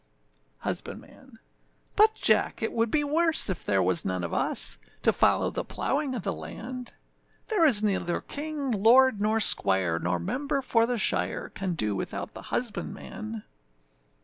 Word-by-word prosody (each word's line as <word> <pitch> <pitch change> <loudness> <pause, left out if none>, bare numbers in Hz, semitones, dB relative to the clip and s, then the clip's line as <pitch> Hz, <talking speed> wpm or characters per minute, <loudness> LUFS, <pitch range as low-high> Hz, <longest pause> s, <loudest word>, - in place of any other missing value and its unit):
HUSBANDMAN. 260 -4 -4 0.6
But, 435 +1 +5
Jack! - - +1
it 225 - -2
would 230 0 0
be 295 +5 +2
worse 315 - +2
if 180 - -5
there 95 -2 +1
was 90 -1 +3
none 95 -1 -3
of 85 - -4
us - - -1 0.2
To - - +3
follow - - +2
the - - -3
plowing 275 -2 -2
of 225 - -5
the - - -2
land; 250 +1 -7 0.6
There 405 -8 +4
is 215 -7 +7
neither 190 -4 0
king, 290 -2 -5
lord, 230 +2 +4
nor 215 +1 +1
squire, 95 - +3
nor 90 +1 -1
member 275 - -3
for 230 -2 +2
the 245 0 -1
shire, 90 - -1
Can 190 -3 -4
do 105 -9 -1
without - - -5
the - - -9
husbandman. 110 0 -5
225 Hz, 155 wpm, -27 LUFS, -, 0.6 s, is